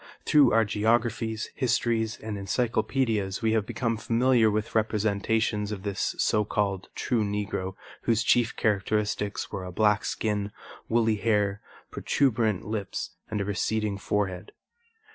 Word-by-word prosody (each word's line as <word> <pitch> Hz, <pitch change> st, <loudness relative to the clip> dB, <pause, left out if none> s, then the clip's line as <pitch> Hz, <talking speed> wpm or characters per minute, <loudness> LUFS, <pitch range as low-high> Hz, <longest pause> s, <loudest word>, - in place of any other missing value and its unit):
Through 145 Hz, -4 st, +5 dB
our 115 Hz, 0 st, +4 dB
geographies, 110 Hz, +1 st, 0 dB
histories 115 Hz, -4 st, 0 dB
and 110 Hz, -1 st, -5 dB
encyclopedias 110 Hz, 0 st, 0 dB
we 110 Hz, -, +3 dB
have 110 Hz, -1 st, +1 dB
become 115 Hz, -3 st, -1 dB
familiar 115 Hz, +1 st, +3 dB
with 105 Hz, +1 st, -2 dB
representations 110 Hz, 0 st, 0 dB
of 100 Hz, -3 st, -5 dB
this 100 Hz, -2 st, -2 dB
so 105 Hz, -, +2 dB
called 100 Hz, -2 st, -1 dB
true 120 Hz, -4 st, 0 dB
Negro, 100 Hz, -2 st, -3 dB, 0.3 s
whose 115 Hz, -1 st, +2 dB
chief 120 Hz, 0 st, +3 dB
characteristics 105 Hz, -1 st, -1 dB
were 95 Hz, -, -4 dB
a 90 Hz, -, -6 dB
black 105 Hz, +2 st, +2 dB
skin, 105 Hz, -2 st, -2 dB, 0.4 s
woolly 115 Hz, -1 st, +2 dB
hair, 105 Hz, -2 st, +1 dB, 0.3 s
protuberant 115 Hz, -7 st, +1 dB
lips 105 Hz, -2 st, -4 dB, 0.2 s
and 105 Hz, -2 st, -2 dB
a -, -, -1 dB
receding 105 Hz, +1 st, -1 dB
forehead. 95 Hz, -2 st, -2 dB
110 Hz, 130 wpm, -27 LUFS, 100-115 Hz, 0.4 s, Through